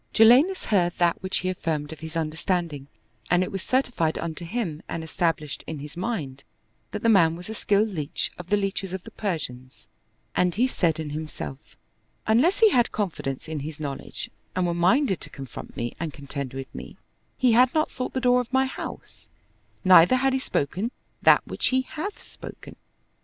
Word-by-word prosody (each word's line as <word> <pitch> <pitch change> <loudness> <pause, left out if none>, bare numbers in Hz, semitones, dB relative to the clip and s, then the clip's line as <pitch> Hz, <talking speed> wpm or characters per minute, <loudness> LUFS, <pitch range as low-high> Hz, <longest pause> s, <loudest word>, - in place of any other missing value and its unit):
Jalinus 260 +12 +6
heard 175 -5 +2
that 170 -1 +2
which 190 0 0
he 185 - -1
affirmed 160 -4 -2
of 155 - -12
his 160 +1 -5
understanding, 160 -2 -2 0.4
and 180 0 +4
it - - -4
was 195 - -3
certified 240 -12 +1
unto 170 0 -4
him 170 -6 -3
and 165 - -3
established 160 -2 -1
in 160 - -4
his 145 +1 -8
mind 170 - -3 0.5
that - - -5
the - - +3
man 170 -7 +5
was 175 +4 -9
a - - -3
skilled 210 0 +2
leach 155 -7 -2
of 180 - -8
the 205 +2 +3
leaches 195 -2 -1
of 190 -1 -4
the - - -11
Persians 130 - -5 0.5
and 180 -1 +2
he 240 +5 +3
said 165 -10 +1
in 155 -2 -4
himself, 150 -2 -7 0.5
"Unless 270 - +3
he 440 -2 +7
had 240 -5 +3
confidence 165 -11 -3
in 155 -1 -3
his 155 +2 -6
knowledge 140 -3 -5 0.2
and 185 -1 +1
were 170 - +1
minded 190 - +3
to - - -5
confront 135 -3 -9
me 120 0 -3
and 165 -1 -3
contend 140 -2 -6
with 135 -1 -7
me, - - -9 0.4
he 250 -2 +4
had 245 +2 +6
not 310 0 +2
sought 255 - -4
the 260 - 0
door 250 0 +4
of 245 - -9
my 265 0 +3
house, 260 - -8 0.5
neither 185 +3 +8
had 265 +1 +2
he 265 - +2
spoken 190 - -1 0.3
that - - +6
which - - -1
he 260 0 +3
hath 375 +10 -6
spoken." - - -10
175 Hz, 190 wpm, -25 LUFS, 155-230 Hz, 0.5 s, neither